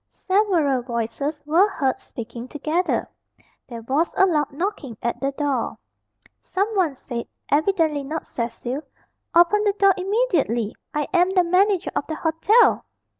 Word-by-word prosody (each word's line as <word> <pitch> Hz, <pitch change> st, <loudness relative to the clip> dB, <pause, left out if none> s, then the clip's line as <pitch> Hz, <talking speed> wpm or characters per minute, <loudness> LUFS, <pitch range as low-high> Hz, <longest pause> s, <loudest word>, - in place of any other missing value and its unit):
Several 360 Hz, -10 st, +1 dB
voices 240 Hz, +5 st, -3 dB
were 345 Hz, +7 st, +4 dB
heard 270 Hz, -9 st, -1 dB
speaking 235 Hz, +1 st, -8 dB
together. 310 Hz, +6 st, -1 dB, 0.6 s
There 235 Hz, -2 st, -8 dB
was 280 Hz, +8 st, 0 dB
a 385 Hz, -, +6 dB
loud 300 Hz, -6 st, +1 dB
knocking 285 Hz, -, -4 dB
at 235 Hz, -, -1 dB
the 275 Hz, 0 st, 0 dB
door. 285 Hz, -1 st, -1 dB, 0.6 s
Someone 380 Hz, -6 st, 0 dB
said, 240 Hz, -2 st, -6 dB, 0.2 s
evidently 310 Hz, -2 st, +2 dB
not 310 Hz, +4 st, -4 dB
Cecil, 240 Hz, +3 st, -4 dB, 0.5 s
"Open 350 Hz, +5 st, +5 dB
the 410 Hz, -1 st, +2 dB
door 395 Hz, -1 st, +4 dB
immediately! 365 Hz, -, 0 dB, 0.2 s
I 295 Hz, -1 st, -2 dB
am 360 Hz, 0 st, +4 dB
the 375 Hz, -1 st, +3 dB
manager 370 Hz, +2 st, +2 dB
of -, -, -1 dB
the 315 Hz, -, -3 dB
hotel! 325 Hz, +10 st, +3 dB
315 Hz, 135 wpm, -23 LUFS, 270-375 Hz, 0.6 s, a